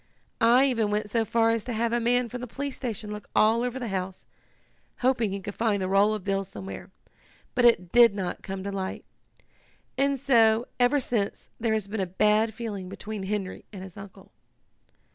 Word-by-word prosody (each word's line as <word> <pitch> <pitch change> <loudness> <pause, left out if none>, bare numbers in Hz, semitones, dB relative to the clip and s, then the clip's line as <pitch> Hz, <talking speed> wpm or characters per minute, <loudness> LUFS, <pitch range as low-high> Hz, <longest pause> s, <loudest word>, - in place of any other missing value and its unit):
I 245 +4 +6
even 230 -6 +1
went 210 0 -2
so 230 0 +2
far 225 +1 +2
as 230 -2 0
to 245 - -3
have 230 +1 0
a 240 - +2
man 245 +1 +2
from 245 +2 -7
the 250 - -5
police 280 +3 -5
station 220 -4 -5
look 210 0 -8
all 225 +2 +4
over 250 +1 -2
the 245 -3 -4
house, 185 -1 -4 0.8
hoping 245 -4 +2
he 200 - -3
could 205 +1 -6
find 220 -2 0
the 185 - -1
roll 200 +3 +3
of 210 - -7
bills 195 0 -1
somewhere, 190 0 -8 0.6
but 245 - +2
it 180 -7 +4
did 235 -4 +6
not 185 -3 -3
come 190 -1 -6
to 200 - -4
light. 190 -1 -4 0.9
And 275 0 +2
so, 230 -3 +4
ever 250 +4 +4
since, 225 -6 -2
there 225 -1 +1
has 215 -2 -2
been 210 +1 -4
a 190 - 0
bad 210 +4 +2
feeling 205 -5 -5
between 205 +2 -6
Henry 195 -1 -3
and 190 -3 -8
his 190 -2 -11
uncle." 195 -1 -12
215 Hz, 200 wpm, -27 LUFS, 195-235 Hz, 0.9 s, I